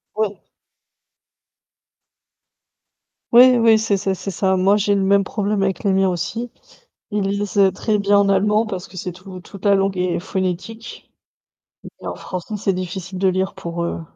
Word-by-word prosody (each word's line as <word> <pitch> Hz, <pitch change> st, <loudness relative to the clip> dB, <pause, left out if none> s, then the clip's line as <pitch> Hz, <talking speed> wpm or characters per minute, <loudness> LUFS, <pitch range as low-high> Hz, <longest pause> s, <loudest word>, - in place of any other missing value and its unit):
Ouais. 210 Hz, -2 st, -2 dB, 2.9 s
Oui, 250 Hz, +2 st, +8 dB
oui 225 Hz, -1 st, +5 dB
c'est 215 Hz, -2 st, 0 dB
c'est 195 Hz, 0 st, -1 dB
c'est 195 Hz, -, -6 dB
ça. 190 Hz, 0 st, +1 dB
Moi 195 Hz, +2 st, +4 dB
j'ai 205 Hz, 0 st, +1 dB
le 195 Hz, -, +1 dB
même 200 Hz, 0 st, +3 dB
problème 205 Hz, 0 st, -2 dB
avec 195 Hz, +2 st, -1 dB
les 195 Hz, -2 st, +2 dB
miens 190 Hz, 0 st, +3 dB
aussi. 220 Hz, +7 st, -4 dB, 0.6 s
Ils 205 Hz, -1 st, 0 dB
lisent, 200 Hz, +2 st, -2 dB
heu, 195 Hz, -1 st, +5 dB
très 210 Hz, +3 st, -1 dB
bien 200 Hz, 0 st, +3 dB
en 200 Hz, 0 st, +3 dB
allemand 210 Hz, +3 st, +2 dB
parce 190 Hz, -4 st, -6 dB
que 185 Hz, -, -13 dB
c'est 180 Hz, 0 st, -5 dB
tout 185 Hz, 0 st, -11 dB
toute 195 Hz, +2 st, -13 dB
la 200 Hz, -, +5 dB
langue 195 Hz, -1 st, 0 dB
est 180 Hz, -1 st, 0 dB
phonétique. 190 Hz, +5 st, -5 dB, 0.9 s
Mais -, -, -7 dB
en -, -, -4 dB
français 185 Hz, +4 st, -6 dB
c'est 195 Hz, -1 st, 0 dB
difficile 185 Hz, +1 st, -5 dB
de 190 Hz, 0 st, +3 dB
lire 190 Hz, +1 st, -1 dB
pour 170 Hz, 0 st, -5 dB
eux. 170 Hz, -, -4 dB
195 Hz, 175 wpm, -20 LUFS, 185-205 Hz, 2.9 s, Oui